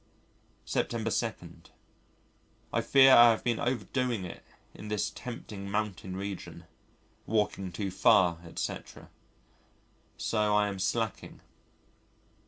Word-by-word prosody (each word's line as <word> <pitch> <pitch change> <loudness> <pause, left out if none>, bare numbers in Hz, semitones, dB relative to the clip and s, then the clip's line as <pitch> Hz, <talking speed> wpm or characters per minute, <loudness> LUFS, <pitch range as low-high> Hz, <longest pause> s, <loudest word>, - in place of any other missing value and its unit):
September - - -1
2. - - 0 1.4
I 115 - +2
fear 135 +3 +6
I 120 -1 +9
have 115 - +1
been 120 -2 0
overdoing 120 -2 -1
it 90 - -9 0.3
in 105 - -10
this 105 -1 -1
tempting 105 -5 -8
mountain 100 -3 -3
region. 100 0 -6 0.6
Walking 105 -3 -1
too 95 +2 -4
far, 90 -5 +4
etc. 85 - -6 1.1
So 105 -2 +1
I 105 0 +3
am 100 -1 -6
slacking. 110 +2 -2
105 Hz, 105 wpm, -29 LUFS, 95-115 Hz, 1.4 s, I